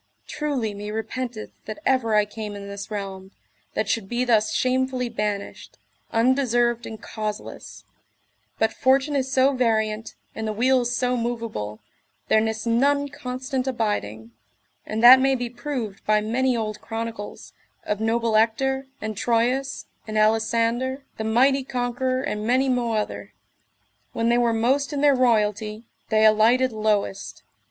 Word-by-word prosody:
Truly 270 -8 -2
me 205 +1 -6
repenteth 225 +1 -4
that 215 - -6
ever 240 -5 +2
I 210 -1 +4
came 210 0 -7
in 200 0 -8
this 200 0 -7
realm, 195 -2 -6 0.5
that 215 - 0
should 215 -2 -1
be 245 +1 0
thus 220 -3 +3
shamefully 255 -1 0
banished, 210 -3 -4 0.3
undeserved 240 -1 +2
and 220 -1 -8
causeless; 215 -1 -6 0.7
but 220 0 +1
fortune 270 +3 +2
is 265 -1 -1
so 270 +1 +4
variant, 220 -3 0 0.2
and 220 0 -4
the 215 - -1
wheel 250 +3 +2
so 250 +1 0
moveable, 230 - -4 0.5
there 220 - +5
nis 220 0 -2
none 280 +5 +2
constant 255 0 -4
abiding, 120 - -2 0.6
and 220 +2 -2
that 255 +2 +11
may 270 0 +3
be 245 -2 -4
proved 240 -5 -5
by 215 0 +4
many 245 +4 0
old 215 -2 -4
chronicles, 225 -2 -6 0.3
of 210 0 -2
noble 225 0 +1
Ector, 265 +5 +1
and 215 0 -4
Troilus, 245 +5 0 0.2
and 215 0 -3
Alisander, 230 +5 +1
the 220 - -3
mighty 260 +5 +3
conqueror, 255 +1 -1
and 210 -6 -3
many 260 +2 +3
mo 245 -2 0
other; 215 -1 -3 0.8
when 230 0 0
they 240 - +4
were 240 -1 +3
most 265 +6 +1
in 280 - -1
their 290 -1 +5
royalty, 215 -3 +1 0.3
they 220 0 +4
alighted 230 +4 +4
lowest. 215 -2 -1
230 Hz, 145 wpm, -24 LUFS, 215-255 Hz, 0.8 s, that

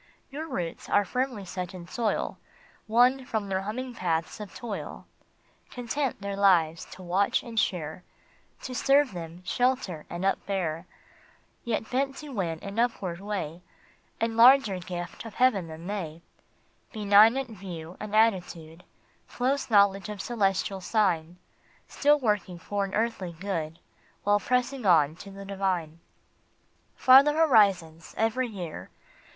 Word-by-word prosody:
Your 310 +4 -5
roots 175 - -5
are 205 - +3
firmly 250 -2 -2
set 180 0 -5
in 175 -2 -9
soil 230 +1 -2 0.5
Won 250 +4 +4
from 220 -5 -3
their 190 0 0
humming 245 +6 -5
paths 165 -5 -2
of 210 -4 -9
toil; 225 -4 -6 0.6
Content 250 -1 -3
their 200 0 -3
lives 170 -5 +3
to 185 - -11
watch 185 +3 +1
and 230 -2 -2
share, 180 -4 -2 0.6
To 255 - -5
serve 275 +1 +3
them, 170 0 -8
shelter, 245 - -1
and 175 +2 -4
upbear, 185 -4 -1 0.8
Yet 220 -2 -3
bent 270 +1 0
to 300 - -9
win 180 -10 -2
an 200 +2 -5
upward 195 -8 -1
way 190 -5 -4 0.6
And 225 0 -1
larger 230 -5 +6
gift 175 -1 -6
of 225 -3 -10
heaven 225 -9 +2
than 160 +1 -9
they, 170 -5 -5 0.7
Benignant 220 +4 +4
view 180 -4 -8
and 215 0 -5
attitude, 180 -6 0 0.5
Close 265 +2 -1
knowledge 200 -1 +4
of 210 -1 -6
celestial 195 -3 -1
sign, 180 -5 0 0.5
Still 295 +1 +3
working 210 -7 -1
for 200 +3 -2
all 195 - -11
earthly 215 -6 -1
good 165 -3 -4 0.5
While 205 0 +3
pressing 250 +3 -1
on 160 -6 +4
to 200 - -10
the 195 0 -10
Divine. 185 -5 -2 0.5
" - - -40
Farther 270 +3 +7
horizons 195 - +3
every 225 +3 +1
year 180 -8 -7
200 Hz, 135 wpm, -27 LUFS, 175-235 Hz, 0.8 s, Farther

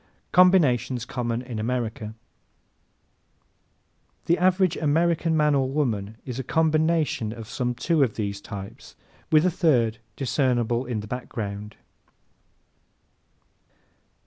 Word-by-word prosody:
Combinations 135 -10 +4
Common 120 -1 -3
in 120 -4 -6
America 110 -2 -3 2.1
¶ - - -38
The 170 - +2
average 185 -1 +3
American 165 +1 +1
man 150 -1 +3
or 135 -2 +1
woman 110 -7 -1
is 125 -1 -5
a - - -2
COMBINATION 155 -5 +1
of 115 -1 -8
some 125 0 -2
two 160 +5 +1
of 125 -6 +2
these 100 -2 -3
types 100 -2 -9 0.4
with 155 +1 +5
a 185 - +3
third 120 - +2 0.2
discernible 125 -3 0
in 115 -4 -2
the 105 - -9
background. 105 -3 -5
125 Hz, 115 wpm, -25 LUFS, 110-155 Hz, 2.1 s, with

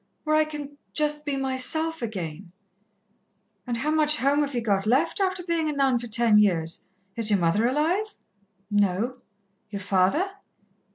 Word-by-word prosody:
Where 310 0 +1
I 310 0 +4
can 290 -2 -8
just 300 -1 +1
be 285 - 0
myself 270 +5 -1
again 185 -5 -5 0.6
" 205 -1 -44
"And 240 -1 -2
how 290 +6 -1
much 305 -1 +3
home 285 +2 +2
have 285 -2 -2
ye - - +1
got 205 -3 0
left, 275 - +2
after 375 -2 0
being 335 -3 -1
a - - -2
nun 270 -3 +2
ten 235 -2 +3
years? 170 -6 +1 0.3
Is 230 -2 +1
your 205 - +4
mother 180 +6 +2
alive?" 335 - 0 0.6
"No." 205 +5 +1 0.5
"Your 200 -1 -6
father?" 195 - +1
255 Hz, 160 wpm, -25 LUFS, 205-305 Hz, 0.6 s, I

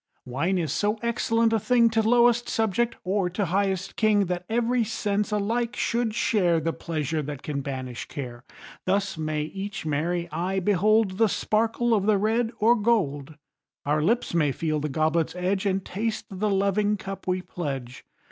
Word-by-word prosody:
Wine 165 +10 0
is 160 -5 -1
so 210 +5 0
excellent 230 -1 +1
a 225 - +3
thing 240 +1 +4
To 225 0 +2
lowest 240 +1 +3
subject, 225 +2 0
or 190 0 0
to 195 +3 -1
highest 190 +1 -1
king, 210 -2 +3
That 180 0 -3
every 240 +1 +1
sense 210 -1 -1
alike 225 +3 -1
should 230 -2 0
share 180 -8 +2
The 165 +1 -1
pleasure 155 -1 -2
that 145 -1 -6
can 140 -2 -3
banish 130 -3 -5
care. 120 -4 -7 0.4
Thus 195 +1 +1
may 155 -1 -2
each 195 +3 -6
merry 170 +4 -1
eye 180 +5 -1
behold 205 +1 +2
The 225 -2 +4
sparkle 230 +4 +1
of 205 -2 +1
the 215 -2 +4
red 225 +3 +1
or 230 +3 +4
gold. 160 - 0 0.5
Our 150 +2 +1
lips 230 +8 +1
may 155 -4 +2
feel 155 +2 -1
the 150 +1 -2
goblet's 155 +3 0
edge 190 +2 0
And 190 0 -1
taste 220 +3 -3
the 200 +2 -1
loving 200 +1 +1
cup 195 0 -7
we 185 0 0
pledge. 135 -9 -5
195 Hz, 170 wpm, -26 LUFS, 160-220 Hz, 0.5 s, thing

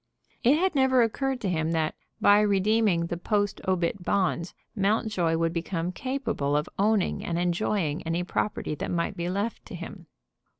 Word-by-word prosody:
It 265 +6 +5
had 375 +3 +1
never 265 -3 +4
occurred 265 +3 -1
to 205 - -1
him 165 -2 0
that, 160 -1 0 0.3
by 205 0 +6
redeeming 205 -3 +2
the 170 +1 -3
post 205 +2 -1
obit 185 0 0
bonds, 180 -2 0 0.2
Mountjoy 200 -5 +1
would 165 0 0
become 170 0 -2
capable 220 - -1
of 150 - -1
owning 210 -1 +2
and 170 - -2
enjoying 175 -2 0
any 165 +2 -1
property 180 -2 -2
that 150 - -4
might 170 -1 -1
be 170 +1 -3
left 200 +5 -2
to - - -8
him. - - -9
185 Hz, 165 wpm, -27 LUFS, 170-215 Hz, 0.3 s, by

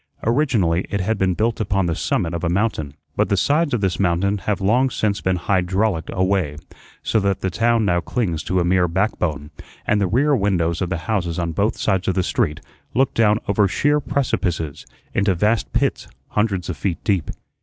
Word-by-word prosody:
Originally 110 - +1
it 100 - -1
had 100 +3 -1
been 95 -2 +1
built 115 +3 0
upon 95 -2 +1
the 85 - 0
summit 80 +1 -1
of 85 - -4
a 85 - +1
mountain, 85 -7 -1 0.2
but - - +1
the 100 - +2
sides 145 - +2
of 120 - 0
this 95 -3 0
mountain 100 +2 +1
have 105 +1 -1
long 120 +7 +3
since 105 -4 -1
been 95 -1 +1
"hydrau 95 +3 +1
licked" 80 -1 -7
away, 95 -6 0 0.5
so 110 - +1
that 100 -2 0
the 95 - -1
town 115 +2 +2
now 90 -2 +2
clings 85 -4 -2
to 95 - 0
a 85 - +1
mere 90 0 +3
back 95 +6 0
bone, 75 -3 -2 0.3
and 105 -1 +2
the 95 - +2
rear 140 +9 +2
windows 90 -6 0
of 90 - -1
the 95 - -1
houses 90 -7 -1
on 85 -1 -1
both 100 +7 0
sides 95 -2 0
of 95 - +1
the 95 - +1
street 75 -3 -1 0.3
look 135 +1 +2
down 105 -2 +3
over 100 0 +3
sheer 145 +10 +2
precipices, 90 - -2 0.3
into 100 -1 +2
vast 105 +6 +1
pits - - 0 0.2
hundreds 100 -4 0
of 90 - -3
feet 85 +2 -2
deep. 95 -8 0
95 Hz, 205 wpm, -21 LUFS, 85-110 Hz, 0.5 s, long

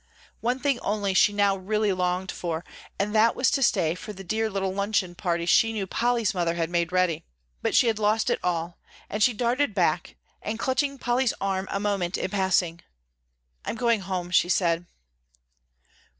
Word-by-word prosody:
One 245 +2 0
thing 275 -3 0
only 205 -2 -1
she 195 - +5
now 200 -1 +2
really 205 +2 0
longed 180 +1 -1
for, 170 -1 -4 0.3
and 205 +1 -1
that 225 +1 +4
was 255 - +2
to 275 - +1
stay 165 -10 +2
for 195 +4 -8
the 195 -1 -10
dear 220 +4 -1
little 195 -2 -2
luncheon 200 -2 0
party 170 -2 -2
she 225 +5 +4
knew 205 -3 -2
Polly's 235 +1 0
mother 170 -2 0
had 165 0 -2
made 170 -1 0
ready. 185 -3 +1 0.4
But - - 0
she - - +6
had 225 -2 +1
lost 215 +1 +2
it - - 0
all; 170 -1 -2 0.3
and 210 - -3
she 245 - +5
darted 240 +2 0
back - - 0 0.3
and, 215 +1 -3
clutching 275 +3 0
Polly's 245 0 +1
arm 195 -1 -1
a 195 - -2
moment 195 -3 -1
in - - -3
passing, 190 -4 +1 0.8
"I'm - - -3
going 235 -1 +2
home," 185 -2 -4
she 175 - +3
said. 170 -2 +1
195 Hz, 180 wpm, -26 LUFS, 180-225 Hz, 0.8 s, she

